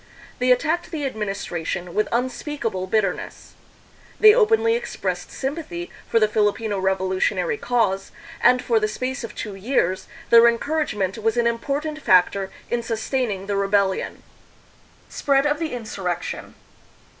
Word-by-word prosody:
They 250 0 +3
attacked 320 +7 +1
the 310 -5 -3
administration 190 -6 -4
with 215 -1 +1
unspeakable 235 -5 -2
bitterness. 200 -2 -2 0.7
They 430 -1 +9
openly 455 0 +4
expressed 475 +1 -3
sympathy 265 - -5 0.2
for 230 - +3
the 215 - +4
Filipino 210 -1 0
revolu 190 0 0
tionary 460 - 0
cause, 210 -6 0 0.3
and 250 0 +5
for 230 -2 +2
the 215 - +1
space 255 +5 -4
of 230 - -7
two 210 - -5
years 195 -3 0 0.2
their 235 0 +8
encour 300 +7 -1
agement 200 -7 -2
was 225 +2 +1
an 240 - +2
important 285 +6 -2
factor 190 0 +3 0.2
in 240 - +1
sustaining 225 -3 -2
the 200 0 -2
rebellion. 195 -1 0 0.8
Spread 275 0 +1
of 295 0 +1
the 325 -2 -2
Insurrection. 195 -7 -4
230 Hz, 135 wpm, -23 LUFS, 195-275 Hz, 0.8 s, They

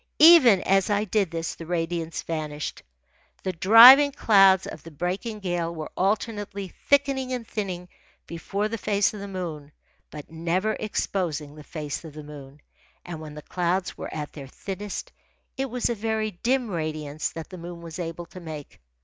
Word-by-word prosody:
Even 260 - +8
as 195 +2 +2
I 205 0 +2
did 205 -3 0
this, 165 0 -3
the 165 - -10
radiance 165 -1 -2
vanished. 155 -2 -4 0.6
The 185 - -2
driving 240 - +9
clouds 195 -7 +5
of - - -8
the 165 - -11
breaking 185 - -4
gale 175 -2 -2
were 155 -1 -6
alternately 205 0 -2
thickening 275 0 +1
and 240 -3 -4
thinning 185 -4 -4 0.4
before 195 +5 -3
the 230 +1 -5
face 200 +1 +1
of 210 - -7
the 200 - -6
moon, 165 -6 -6 0.4
but 150 0 -10
never 175 +6 -1
exposing 165 -8 -2
the 150 0 -12
face 150 -2 -5
of 160 -3 -10
the 155 - -8
moon. 145 -1 -12 0.4
And 165 -3 -7
when 150 -1 -9
the 150 - -9
clouds 180 +1 -1
were - - -7
at 150 -1 -5
their 140 -3 -9
thinnest, 195 +7 -6 0.4
it 270 0 -2
was 245 +1 -1
a 235 - 0
very 220 0 -2
dim 240 +5 -1
radiance 155 -3 -3
that 165 -1 -8
the 185 - -8
moon 170 0 -8
was 165 +1 -8
able 170 0 -5
to 185 - -12
make. 155 - -9
180 Hz, 175 wpm, -25 LUFS, 160-210 Hz, 0.6 s, driving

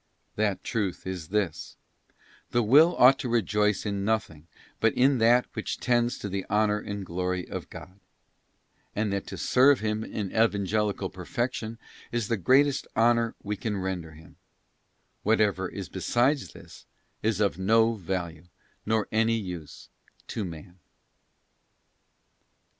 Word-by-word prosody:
That 105 -2 0
truth 105 -7 -2
is 90 -4 -5
this: 100 -5 -2 0.7
The 120 0 +1
Will 150 +10 +6
ought 130 +2 +7
to 125 - -3
rejoice 105 -3 +1
in 100 -1 -2
nothing 100 -8 -2 0.3
but 115 - +2
in 130 0 +3
that 120 +2 +5
which 110 - -4
tends 120 -1 +1
to - - -5
the 95 -1 -3
Honour 105 0 +2
and 100 -1 -6
Glory 90 +1 -2
of - - -6
God; 95 +2 -11 1.0
and 105 -1 0
that 100 - -3
to - - -7
serve 135 +1 +4
Him 110 0 -1
in 105 -3 -4
Evangelical 105 -2 +1
Perfection 115 +5 -3 0.3
is 120 -3 -2
the 115 - +1
greatest 135 +8 +3
honour 115 0 +3
we 105 +1 -2
can 105 0 -3
render 90 -4 -4
Him: 80 +1 -16 0.8
whatever 105 -4 +1
is 100 -2 -6
beside 120 +9 +1
this - - -13 0.3
is 110 -2 0
of 100 -3 +1
no 110 +4 +3
value 90 -4 -5 0.4
nor 110 0 +2
of - - -20
any 115 +1 +2
use 90 -7 -7 0.4
to 110 - -3
man. 90 +1 -9
105 Hz, 140 wpm, -27 LUFS, 95-115 Hz, 1.0 s, ought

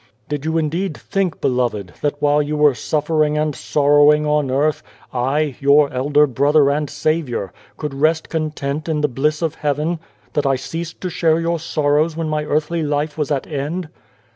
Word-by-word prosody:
" 120 - -39
Did 145 0 -3
you 160 +1 0
indeed 160 +2 -1
think, 195 -4 -2
beloved, 120 -7 -1
that 145 0 -1
while 145 0 +3
you 150 +1 -2
were 150 -2 +5
suffering 150 +2 0
and 155 0 0
sorrowing 145 +3 +4
on 150 -2 +1
earth, 145 +4 +1 0.3
I, 135 +3 0
your 140 +1 +4
elder 145 +3 +3
Brother 140 +2 +3
and 150 0 -1
Saviour, 135 - -2 0.2
could 150 -2 -4
rest 155 +3 +1
content 155 -1 -3
in 155 -2 0
the 150 - +3
bliss 150 +5 -1
of 160 -2 0
heaven? 150 +3 -1 0.3
that 145 -2 +1
I 135 - +3
ceased 165 +5 -6
to 185 - -3
share 165 -1 +2
your 170 0 -1
sorrows 155 0 +1
when 165 -1 -2
my 155 0 -1
earthly 155 +3 0
life 150 0 -1
was 150 -3 -2
at 140 -3 -1
end 155 +4 -4
150 Hz, 180 wpm, -19 LUFS, 145-155 Hz, 0.3 s, were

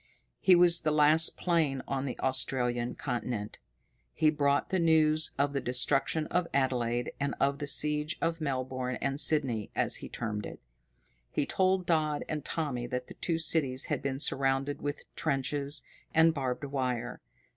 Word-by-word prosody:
His 185 - +6
was 175 -1 +6
the 155 - +1
last 155 +2 +4
plane 155 -7 +1
on 135 0 -2
the 130 - -4
Australian 125 -2 -1
continent. 120 -5 -4 0.6
He 155 - +3
brought 140 -2 +1
the 190 - +1
news 155 -1 +3
of 140 +1 +1
the 140 - -1
destruction 135 +5 +1
of 180 -1 +1
Adelaide, 120 -3 0
and 140 0 -1
of 140 +1 +1
the 145 - -4
siege 150 +2 0
of 165 0 -1
Melbourne 130 -3 -2
and 135 +1 -1
Sydney, 135 -8 +1
as - - +1
he - - -8
termed 105 -2 -4
it. - - -10 0.7
He 145 - -1
told 185 +1 +1
Dodd 155 -3 0
and 150 -2 -3
Tommy 140 -8 -3
that 125 0 -4
the - - -8
two 165 -2 -2
cities 145 -5 +1
had - - -2
been 135 -1 -3
surrounded 135 0 0
with 145 0 -4
trenches 140 0 0 0.3
and 160 0 +6
barbed 130 -3 -3
wire. 125 -4 -3
140 Hz, 160 wpm, -30 LUFS, 130-155 Hz, 0.7 s, His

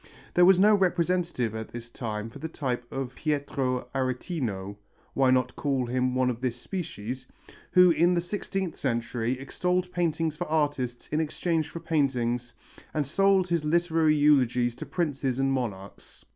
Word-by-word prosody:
There 175 - +6
was 190 0 +7
no 210 +2 +6
representative 175 - +1
at 110 0 -5
this 120 -1 -8
time 110 -1 -4
of - - -10
the 160 - -3
type 125 -6 -4
of 135 -2 -4
Pietro 140 -4 -1
Aretino 125 - -2 0.4
why 135 -1 +3
not 125 -1 +2
call 135 -3 0
him 125 +1 0
one 130 -1 +2
of 120 0 -7
this 125 -2 -1
species 125 - -5 0.5
who 180 -1 +7
in 170 +3 +3
the - - +2
sixteenth 190 -1 -3
century 120 0 -1
extolled 180 +6 -1
paintings 165 -3 0
for 175 +3 -4
artists 145 -6 -1
in 155 +1 +1
exchange 160 0 -1
for 170 - -7
paintings 125 -7 0 0.4
and 150 -2 +1
sold 195 +5 +3
his 170 -2 +1
literary 160 -1 +2
eulogies 125 -5 +3
to - - -7
princes 140 -7 -1
and 135 0 +1
monarchs. 100 -7 -5
140 Hz, 160 wpm, -27 LUFS, 125-170 Hz, 0.5 s, was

